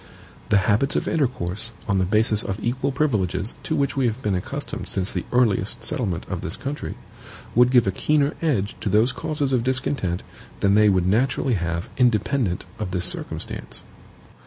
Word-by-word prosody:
The 105 - +5
habits 110 +7 +2
of - - 0
intercourse, 115 - -1
on 100 -3 +2
the 95 - +2
basis 105 +2 +3
of 95 +2 -3
equal 130 +5 -1
privileges, 110 - 0
to - - -2
which 140 -1 0
we 135 -3 +2
have 115 +2 -2
been 105 - +1
accustomed 90 - -4
since 95 0 -2
the 90 - -3
earliest 110 -6 +2
settlement 95 -9 -1
of - - -4
the - - -4
country, 145 +2 -4 0.6
would 125 +1 +5
give 125 -2 +5
a 95 - +1
keener 150 - +1
edge 120 -11 0
to - - -1
those 110 +5 +4
causes 150 -3 -2
of 120 -2 +2
discontent 125 -8 0 0.4
than 100 0 +4
they 105 0 +6
would 95 -3 +2
naturally 125 +6 +2
have 85 -3 -2
independent 120 -4 +1
of 105 -4 -2
this 90 -1 -1
circumstance. 90 - -4
110 Hz, 175 wpm, -23 LUFS, 95-130 Hz, 0.6 s, they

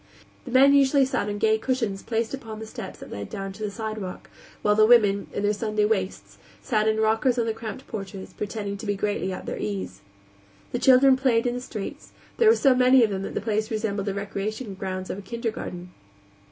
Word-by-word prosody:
The 250 - -7
men 270 +2 +6
usually 275 0 +5
sat 255 -5 -1
on 205 - -3
gay 220 +1 +2
cushions 225 -6 -1
placed 225 0 -2
upon 225 -5 -6
the 220 - -7
steps 220 -3 -8
that - - -11
led 100 0 -6
down 195 -1 -5
to 205 - -13
the 210 - -1
sidewalk, 215 -3 -6 0.3
while 210 - +4
the 215 +1 +5
women, 205 -4 +4
in 200 - -3
their 205 +1 +2
Sunday 215 0 0
"waists," 195 -3 -2 0.2
sat 215 -3 0
in 220 0 +2
rockers 225 +3 +2
on 235 - +1
the 225 - -1
cramped 225 +3 -7
porches, 195 -3 -7
pretending 205 -1 -4
to 210 - -8
be 205 - +1
greatly 200 -1 -1
at 185 - -6
their - - -4
ease. 95 -2 -4 0.7
The 245 - -1
children 260 +1 +6
played 255 -3 +2
in 245 - +1
the 245 - -4
streets; 215 -5 -7 0.2
there 455 -2 +6
were 450 - +6
so 275 - +4
many 255 0 +5
of 215 - +2
them 190 -1 -2
that - - -6
the - - -1
place 215 0 -1
resembled 215 -3 -2
the 200 - -1
recreation 200 +2 -4
grounds 185 -1 -4
of 195 - -5
a - - -7
kindergarten. 200 -5 -5
215 Hz, 220 wpm, -25 LUFS, 200-240 Hz, 0.7 s, men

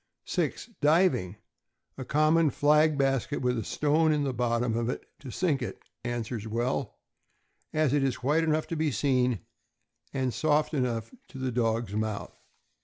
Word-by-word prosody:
6. 245 - -2
Diving. 145 - +3 0.6
A 130 - -6
common 155 +4 +3
flag 150 +2 +3
basket, 135 0 0
with 125 0 +2
a - - -3
stone 155 +7 +2
in 150 -1 +1
the 135 -2 -1
bottom 120 -1 0
of 115 0 -1
it 125 - -4
to 140 - -9
sink 150 -1 0
it, 120 - -4 0.3
answers 120 -2 -3
well, 120 +4 -2 0.7
as 155 -3 +1
it 145 - +3
is 130 -2 -1
white 150 +5 +3
enough 155 -1 +1
to 165 - -2
be 155 -1 +1
seen 125 - +1 0.7
and 130 -3 -1
soft 155 0 +1
enough 120 -5 -1 0.2
to - - -11
the 130 -1 -2
dog's 115 -2 0
mouth. 110 -1 -3
130 Hz, 160 wpm, -28 LUFS, 120-150 Hz, 0.7 s, Diving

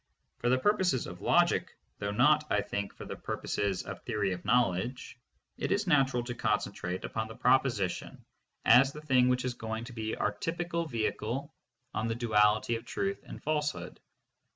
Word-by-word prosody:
For 120 - +1
the 130 - +4
purposes 180 - +2
of - - -9
logic, - - +2 0.2
though 100 - -2
not, 140 +9 +4
I 105 - +2
think, 100 0 -3
for - - -9
the - - -6
purposes 100 -2 -2
of - - -7
theory 105 -5 -1
of 90 - -7
knowledge, 120 +1 0 0.4
it - - -1
is 205 +1 +1
natural 135 -7 +3
to 120 0 -4
concentrate 100 -5 -2
upon 110 0 -3
the 110 - -9
proposition 125 -7 +1 0.4
as 135 +4 +6
the 150 - -8
thing 130 -4 +4
which 125 0 +1
is 125 - -1
going 110 -1 -5
to 120 +1 -9
be 110 -1 -3
our - - 0
typical 170 +8 -3
vehicle 120 +3 -2 0.4
on 110 - -1
the 115 - -1
duality 110 -1 +3
of 115 - -11
truth 195 +9 -3
and - - -9
falsehood. 150 -1 -2
120 Hz, 175 wpm, -30 LUFS, 105-140 Hz, 0.4 s, as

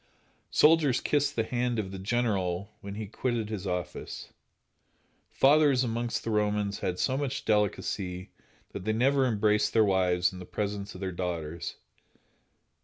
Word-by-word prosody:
Soldiers 150 -5 +4
kissed 145 -1 +1
the 115 - +1
hand 120 +1 -1
of 100 -3 -2
the 95 - -6
general 100 -3 -1
when 100 0 -7
he 110 0 -4
quitted 115 +1 -2
his 100 -2 -4
office. 90 -1 -5 1.0
Fathers 140 -2 +4
amongst 120 0 -2
the 115 - -2
Romans 105 -1 0
had 90 -1 -2
so 130 - +1
much 135 -1 -3
delicacy 100 -3 -1 0.4
that - - -6
they 110 +2 0
never 135 +3 +3
embraced 105 -2 +2
their 110 -1 +5
wives 90 -2 +2
in 90 - -8
the 90 - -8
presence 100 0 -4
of 90 - -9
their 95 -1 -2
daughters. 85 -2 -4
105 Hz, 150 wpm, -29 LUFS, 95-120 Hz, 1.0 s, their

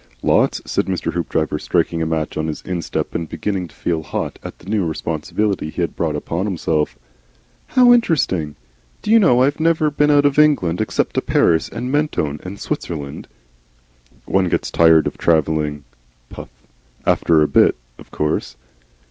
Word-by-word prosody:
"Lots," - - +2
said - - -1
Mr. 95 -2 -2
Hoopdriver, 80 -2 -1
striking 85 -1 0
a 80 - 0
match 80 -1 -2
on 80 - -2
his 80 - -5
instep 90 -3 -3
and 85 -1 -3
beginning 95 -4 -3
to - - -21
feel 80 -2 -2
hot 75 - -5
at - - -9
the - - -18
new 105 -1 0
responsibility 80 +3 -2
he 85 - -4
had 85 - -2
brought 80 -3 -1
upon 85 +6 -3
himself. 80 -5 -1 0.7
"How 250 -2 +6
interesting! 95 - +1 0.5
Do 210 - -1
you 230 - +7
know, 125 - +4
I've 145 +3 0
never 160 -2 +2
been 150 +1 +2
out 145 -1 +4
of 145 +1 +2
England 110 - +3
except 110 - -1
to - - +3
Paris 80 -1 +2
and 125 +3 -5
Mentone 140 - -1
and 95 +2 -8
Switzerland." 70 -4 -5 1.0
"One 95 -2 +1
gets - - -1
tired 80 -1 +5
of - - -4
travelling 75 -2 +1 0.5
(puff) - - -10 0.6
after 80 -2 +3
a - - +2
bit, - - +4 0.2
of - - -14
course." 75 -4 -2
85 Hz, 165 wpm, -19 LUFS, 80-125 Hz, 1.0 s, you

